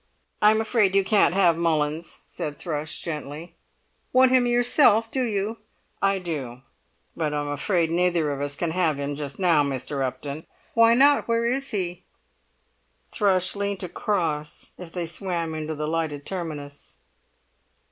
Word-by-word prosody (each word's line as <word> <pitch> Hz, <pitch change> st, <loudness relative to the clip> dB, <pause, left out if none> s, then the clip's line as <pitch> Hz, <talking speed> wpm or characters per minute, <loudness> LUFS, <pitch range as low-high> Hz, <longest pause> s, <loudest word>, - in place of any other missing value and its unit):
"I'm 215 Hz, +1 st, +5 dB
afraid 215 Hz, -4 st, +2 dB
you 195 Hz, -, +4 dB
can't 190 Hz, -2 st, +3 dB
have 180 Hz, -4 st, +4 dB
Mullins," 160 Hz, -1 st, -1 dB
said 150 Hz, -1 st, -6 dB
Thrush, 155 Hz, -2 st, -4 dB
gently. 155 Hz, 0 st, -6 dB, 0.6 s
"Want 255 Hz, 0 st, +5 dB
him 255 Hz, -1 st, +4 dB
yourself 240 Hz, -2 st, +4 dB
do 265 Hz, -, -1 dB
you?" 220 Hz, -1 st, -2 dB, 0.4 s
"I 195 Hz, 0 st, +2 dB
do; 140 Hz, -9 st, -5 dB, 0.5 s
but 155 Hz, -3 st, -1 dB
I'm 145 Hz, 0 st, -2 dB
afraid 165 Hz, +3 st, 0 dB
neither 170 Hz, -3 st, +1 dB
of 140 Hz, -1 st, -4 dB
us 145 Hz, 0 st, -2 dB
can 170 Hz, +1 st, -2 dB
have 160 Hz, -4 st, +1 dB
him 140 Hz, 0 st, -2 dB
just 140 Hz, -1 st, -6 dB
now, 170 Hz, -6 st, +3 dB
Mr. 140 Hz, 0 st, -3 dB
Upton." 140 Hz, +4 st, -5 dB, 0.3 s
"Why 230 Hz, 0 st, +5 dB
not? 285 Hz, +3 st, +5 dB
Where 230 Hz, 0 st, +1 dB
is 270 Hz, +3 st, -1 dB
he." 180 Hz, -3 st, -3 dB, 1.1 s
Thrush 190 Hz, -3 st, +2 dB
leant 200 Hz, -1 st, -3 dB
across 165 Hz, -5 st, -2 dB
as 175 Hz, -2 st, -10 dB
they 175 Hz, -2 st, -3 dB
swam 170 Hz, -1 st, -3 dB
into 155 Hz, 0 st, -4 dB
the 150 Hz, 0 st, -3 dB
lighted 155 Hz, -3 st, -2 dB
terminus. 150 Hz, -6 st, -6 dB
170 Hz, 145 wpm, -25 LUFS, 150-200 Hz, 1.1 s, I'm